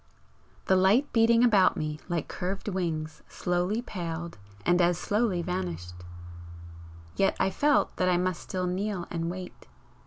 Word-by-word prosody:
The 190 - +4
light 200 +10 +3
beating 230 +1 +5
about 205 -6 +4
me 150 0 -3
like 170 -3 -1
curved 190 +3 -4
wings 165 -5 -3
slowly 180 +6 -1
paled 170 - -5 0.3
and 175 +1 +4
as 175 -1 +3
slowly 205 -2 0
vanished 90 - -4 1.2
yet 195 - +2
I 190 - +2
felt 290 +7 +2
that 185 - +2
I 180 - +3
must 180 -1 -1
still 185 -1 -3
kneel 185 0 -2
and 165 -1 -2
wait. 180 0 -8
180 Hz, 145 wpm, -28 LUFS, 170-200 Hz, 1.2 s, beating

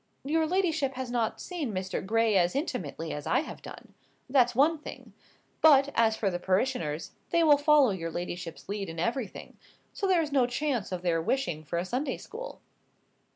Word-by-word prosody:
"Your 315 +3 +1
ladyship 320 -7 0
has 255 -1 -4
not 235 -3 -1
seen 325 -10 -4
Mr. 185 -1 -3
Gray 225 +1 +2
as 180 +1 +3
intimately 175 - -3
as 150 - -6
I 260 - +3
have 315 - -9
done. - - -11 0.3
That's 250 -3 +3
one 305 +5 +3
thing. - - -10 0.5
But, 285 -3 +6
as 225 -1 +3
for 200 -3 0
the 175 - -3
parishioners, 185 - -1 0.2
they 335 - +3
will 295 -3 +6
follow 290 -4 +5
your 165 -3 -3
ladyship's 175 0 -6
lead 200 -2 -4
in 165 - -8
everything; 230 +5 -3 0.4
so 395 - -2
there 360 -3 +3
is 300 - -5
no 265 -3 +3
chance 245 -5 -2
of 180 -1 -4
their 165 -2 +1
wishing 175 - -1
for 155 +3 -4
a 175 - -1
Sunday 260 +7 -2
school." - - -9
245 Hz, 185 wpm, -29 LUFS, 185-290 Hz, 0.5 s, But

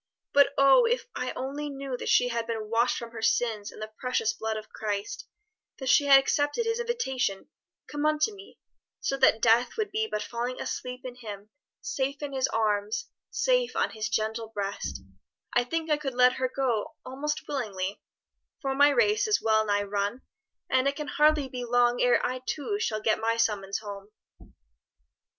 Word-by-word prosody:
But 285 0 +6
oh 275 - +6
if 485 +1 +1
I 250 - -2
only 285 +3 -4
knew 275 -2 -5
that - - -4
she 245 - +4
had 230 -1 -2
been 220 -2 -4
washed 235 +2 +2
from 235 -1 -7
her 225 -1 -7
sins 220 -3 0
in - - -14
the 215 0 -7
precious 250 -3 0
blood 220 0 -3
of 215 0 -8
Christ, 205 -1 -4 0.5
that 265 -2 -3
she 285 - +5
had 275 -1 +9
accepted 290 - +1
His 455 +1 0
invitation, 265 - -2 0.4
'Come 295 +1 -1
unto 310 +8 +1
me,' 395 0 -14 0.4
so 275 - -1
that 235 -4 +4
death 235 - +4
would 430 -2 -1
be 440 +2 0
but 210 - -3
falling 240 +3 -4
asleep 250 0 -4
in 250 -1 -7
Him, 210 -3 -9 0.3
safe 275 +2 -2
in 285 -1 -4
His 265 -1 +1
arms, 215 - -1 0.2
safe - - +1
on - - +1
His 220 -1 -3
gentle 220 +1 -1
breast 200 - -4 0.5
I 245 - +4
think 325 +5 -3
I 300 - +4
could 275 -4 -4
let 250 0 +6
her 255 -1 0
go 250 -5 -1
almost 300 +4 -3
willingly, 200 -8 -3 0.6
for 270 -2 -1
my 285 +2 +6
race 420 +10 +3
is 430 - +3
well 220 -1 +3
nigh 205 0 +2
run, 205 +4 -2 0.4
and 260 +1 +2
it 280 - 0
can 300 0 -5
hardly 300 -1 +3
be 250 -1 -5
long 245 0 +2
ere 245 -1 +4
I 255 0 -2
too 405 +8 -2
shall 215 - -1
get 215 0 +2
my 230 +1 0
summons 205 -4 0
home." 200 -2 -8
250 Hz, 185 wpm, -28 LUFS, 220-290 Hz, 0.6 s, had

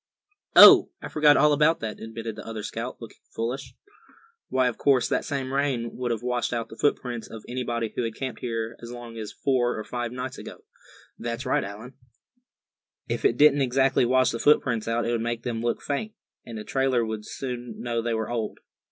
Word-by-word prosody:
"Oh! - - +10
I - - -7
forgot 150 -1 +5
all 150 0 +5
about 155 +3 +3
that," 110 -1 -5
admitted 110 0 -6
the 105 - -8
other 110 -2 -6
scout, 115 +3 -5
looking 115 - -12
foolish. 125 +2 -4 0.7
"Why, 130 -1 +2
of 120 - -3
course, 135 -3 +3
that - - 0
same 135 -3 -3
rain 135 -4 -1
would 125 -1 -3
have 115 -1 -2
washed 125 -1 -1
out 115 -1 -3
the - - -10
footprints 120 -3 -1
of 110 -1 -10
anybody 120 -2 -3
who - - -1
had 115 -1 -3
camped 130 -2 -5
here 115 -1 -3
as 120 0 -8
long 120 -1 -8
ago 115 -1 -7
as 105 - -6
four 125 -3 0
or 110 - -4
five 120 0 -4
nights. 125 +1 -5 0.8
That's 120 +3 -4
right 130 - +1
Allan." 105 +6 -8 1.1
"If - - -3
it 410 - +3
didn't 145 -1 +6
exactly 135 0 +2
wash 130 +1 +3
the 115 - -4
footprints 120 -6 +2
out, 115 +1 0
it 120 - 0
would 115 -1 0
make 115 0 -3
them 115 -2 -3
look 120 0 -2
faint; 210 +10 -3 0.3
and 115 -2 -7
a 105 - -6
trailer 130 -1 +1
would 110 -1 -4
soon 125 0 -6
know 120 -1 -2
they 115 0 -1
were 110 +1 -3
old. 115 -3 -3
120 Hz, 205 wpm, -26 LUFS, 115-130 Hz, 1.1 s, Oh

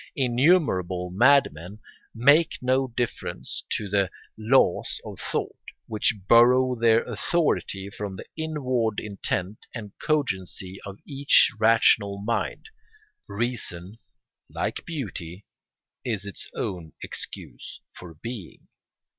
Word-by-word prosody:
Innumerable 120 - +2
madmen 100 - +3 0.4
make 145 +8 +4
no 130 +1 +1
difference 120 -1 -4
to 105 - -2
the 100 -2 +1 0.3
laws 110 -3 +2
of - - -8
thought, - - -2 0.3
which 110 0 0
borrow 125 +2 +6
their 115 -1 +3
authority 115 - -1
from 100 -1 -5
the - - -9
inward 130 -9 -1
intent 100 -1 -3
and 105 -4 -7
cogency 95 - -2
of 100 0 -8
each 140 -3 +4
rational 105 -3 +4
mind. 115 - -3 0.6
Reason, 105 -3 -3 0.5
like - - -3
beauty, 100 - -6 0.6
is 105 -5 -2
its 100 - -7
own 85 -4 -4
excuse - - -7
for 85 -3 -11
being. 110 +1 -9
110 Hz, 105 wpm, -25 LUFS, 95-130 Hz, 0.6 s, borrow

